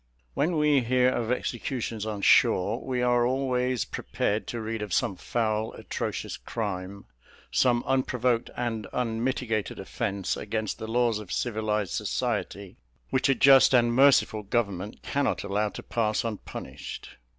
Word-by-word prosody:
When 165 +3 +1
we 150 -2 +4
hear 125 +1 +3
of 120 -2 -1
executions 120 -3 -3
on 105 -2 -4
shore, 105 +7 +4
we 125 -2 -1
are 120 -1 +3
always 125 -1 0
prepared 100 -1 -2
to 120 - -4
read 110 0 -4
of 105 -4 -2
some 95 - +1
foul 110 +1 -1
atrocious - - -4
crime, 100 -2 -5 0.5
some 120 -2 +3
unprovoked 125 -2 +1
and 115 -4 -2
unmitigated 115 -2 -1
offence 100 -1 -2
against 110 0 -3
the 110 - -5
laws 115 -1 +1
of 100 -5 -9
civilized 105 -5 -1
society, 100 -2 -3 0.3
which 130 +1 +2
a 135 - +4
just 135 -1 +7
and 120 -1 +4
merciful 130 -4 +4
government 100 -2 -2
cannot 140 0 0
allow 105 +1 0
to - - -9
pass 110 -2 0
unpunished. 115 -3 -7
115 Hz, 140 wpm, -27 LUFS, 105-125 Hz, 0.5 s, just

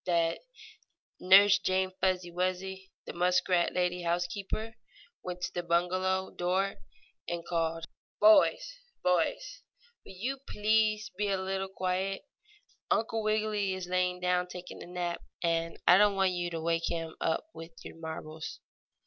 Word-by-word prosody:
that 170 -2 +1 0.8
Nurse 195 +2 +7
Jane 185 0 0
Fuzzy 185 -2 +1
Wuzzy, 185 +2 -3 0.2
the - - -7
muskrat 180 0 +2
lady 180 0 0
housekeeper, 180 +6 -2 0.5
went 180 0 -6
to 175 - -3
the 175 - -2
bungalow 185 +2 0
door 185 +3 -1 0.5
and 170 -1 -4
called: 165 -1 -1 0.3
"Boys! - - +5 0.2
Boys! 180 - 0 0.4
Will - - -12
you 255 +9 -3
please 215 +1 +1
be 210 - +1
a 195 - +1
little 190 0 -2
quiet? 190 +1 -2 0.7
Uncle 225 0 +1
Wiggily 215 -2 0
is 185 -1 -5
lying 180 0 0
down 180 0 +1
taking 180 0 -9
a - - -9
nap, 175 -1 -3 0.2
and 165 0 0
I 180 - +8
don't 205 -1 +4
want 190 -1 +2
you 175 -1 -2
to 165 -1 -4
wake 165 0 0
him 165 -1 -4
up 160 - 0
with 165 +1 -10
your - - -9
marbles." 160 -1 -7
180 Hz, 140 wpm, -30 LUFS, 175-195 Hz, 0.8 s, I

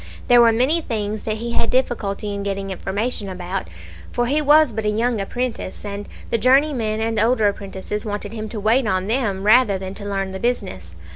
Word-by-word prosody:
There 245 -1 +8
were 230 -1 +6
many 260 +9 +2
things 215 -5 -3
that 215 -1 -1
he 235 +2 -4
had 230 - 0
difficulty 215 -5 -1
in 200 - -4
getting 195 -1 -3
information 200 +3 -3
about, 185 +1 -4 0.4
for 240 - 0
he 290 +5 +1
was 300 -3 +5
but 220 +1 -3
a 210 - +1
young 225 +1 0
apprentice, 235 -1 -4
and 200 0 -6 0.2
the 230 - +2
journeymen 255 -3 +2
and 225 0 0
older 225 -1 +3
apprentices 200 +1 -4
wanted 205 0 -5
him 215 -1 -5
to 220 - -5
wait 225 +4 +2
on 185 -1 0
them 210 -4 -1
rather 215 -1 +5
than 190 0 -6
to 205 0 -7
learn 195 -1 -2
the 190 - -6
business. 95 - -3
215 Hz, 200 wpm, -21 LUFS, 200-240 Hz, 0.4 s, There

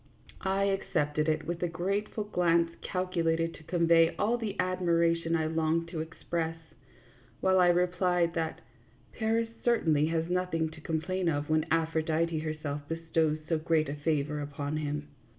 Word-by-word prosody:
I 195 +1 +2
accepted 155 -6 0
it 155 0 0
with 170 0 -4
a 175 - +1
grateful 200 +6 -2
glance 170 -4 +2
calculated 165 -3 0
to - - -13
convey 165 0 +3
all 225 +3 +2
the 220 -4 -4
admiration 170 -2 +2
I 160 -1 +1
longed 160 +1 0
to 170 -2 -4
express, 165 0 -3 0.8
while 190 0 +3
I 180 - +6
replied 180 -1 +2
that 165 -1 -2 0.3
" - - -31
Paris 225 +1 +1
certainly 160 -11 +3
had 165 +1 -1
nothing 180 -3 0
to 160 -1 -13
com 160 0 -1
plain 185 0 -1
of 145 0 -1
when 155 +1 +2
Aphrodite 160 0 +1
herself 155 -2 -4
bestowed 160 -1 0
so 165 -2 +1
great 155 -2 +1
a - - -2
favor 150 0 -1
upon 145 +1 -3
him." 150 -1 -3
165 Hz, 155 wpm, -30 LUFS, 155-180 Hz, 0.8 s, I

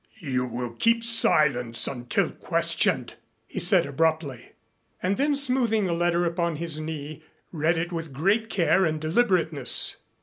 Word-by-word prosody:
"You 130 -7 -2
will 120 0 -5
all - - -15
keep 230 0 +2
silence 135 - +3
until 120 -3 -2
questioned," - - -1 0.3
he - - -7
said - - +5
abruptly, 155 -2 -2 0.5
and 185 +2 -1
then 290 +5 0
smoothing 250 -6 +1
the 175 - -1
letter 175 +1 0
upon 170 -1 -2
his 160 -1 -3
knee, 155 -1 -7 0.3
read 160 +1 0
it 170 +2 -3
with 165 -3 -6
great 200 +11 0
care 190 0 +2
and 155 -3 -1
deliberateness. 160 - +2
165 Hz, 145 wpm, -25 LUFS, 145-190 Hz, 0.5 s, said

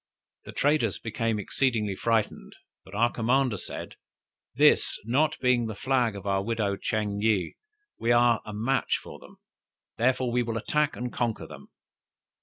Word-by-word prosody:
The - - -8
traders 135 - +1
became 115 +2 -2
exceedingly 105 -2 0
frightened, 115 0 -1 0.3
but 95 - -12
our 120 +3 +3
commander 125 0 +1
said, - - -7 0.6
This - - +4
not 145 +7 +2
being 125 -2 +2
the 110 - -5
flag 125 -3 +1
of 100 - -7
the 100 -1 0
widow 105 -2 -1
Ching 105 0 -2
yih, 105 -6 +1 0.5
we 115 - +1
are 120 -1 +4
a 105 - -8
match 115 +6 0
for - - -11
them, - - -16 0.6
therefore 125 +1 +2
we 125 +1 +2
will 115 -1 -2
attack 150 +6 0
and 125 0 -5
conquer 120 -3 -2
them. - - -12
115 Hz, 155 wpm, -27 LUFS, 105-125 Hz, 0.6 s, This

